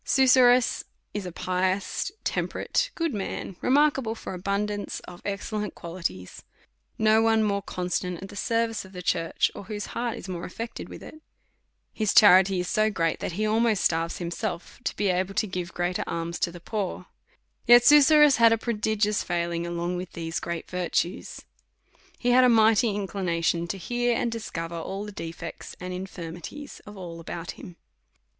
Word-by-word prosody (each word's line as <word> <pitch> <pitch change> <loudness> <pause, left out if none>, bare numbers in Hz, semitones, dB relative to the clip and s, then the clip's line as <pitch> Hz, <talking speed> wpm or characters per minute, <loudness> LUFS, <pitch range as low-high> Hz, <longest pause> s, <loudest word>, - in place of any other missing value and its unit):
Susurrus 255 -2 +4 0.3
is 205 -3 -4
a - - -6
pious, 185 - -1
temperate, - - -1
good 330 -4 -1
man, 195 -2 -4
remark 290 +2 +4
able 225 -3 -3
for 220 - -7
abundance 200 +2 -2
of 175 0 -12
excellent 210 +1 -3
qualities. 165 - -5 0.6
No 220 0 +4
one 225 -1 +3
more 200 -1 0
constant 180 -1 -3
at 195 - -8
the 205 - -11
service 230 0 0
of 190 0 -15
the 180 -1 -7
church, 165 -1 +1
or - - -9
whose 205 0 -5
heart 235 -1 -2
is - - -8
more 175 -2 -5
affected 230 +5 -6
with - - -10
it. 310 - -12 0.7
His 215 -2 0
charity 190 -2 +7
is 180 - -2
so 215 +3 +2
great, 165 -5 0
that - - -4
he 215 +5 -1
almost 220 -1 +2
starves 165 0 +1
himself, 175 +1 -4
to - - -1
be 205 -1 0
able 185 +2 0
to 210 +1 +2
give 180 -3 -4
great 175 +1 -1
er - - 0
alms 170 0 -3
to 170 - 0
the 175 - -10
poor. 190 -1 -4 0.6
Yet 240 +1 +9
Susurrus 295 -1 +7
had 230 -1 +6
a 225 - +4
prodigious 215 -2 0
failing 170 -1 -2
along 175 +1 -2
with 180 0 -6
these 165 0 -3
great 170 -1 -5
virtues. 180 -1 -2 0.8
He 245 - +1
had 255 +1 +6
a 250 - +6
mighty 225 0 +5
inclination 175 -4 -1
to 195 - -3
hear 240 +5 0
and 235 - -1
discover 170 -7 -5
all 195 +5 -5
the 210 - -7
defects 165 -3 -7
and 180 0 -5
infirmities 180 - -7
of 210 -1 -10
all 170 -3 -7
about 170 +1 -6
him. 175 - -11
195 Hz, 175 wpm, -26 LUFS, 175-225 Hz, 0.8 s, Yet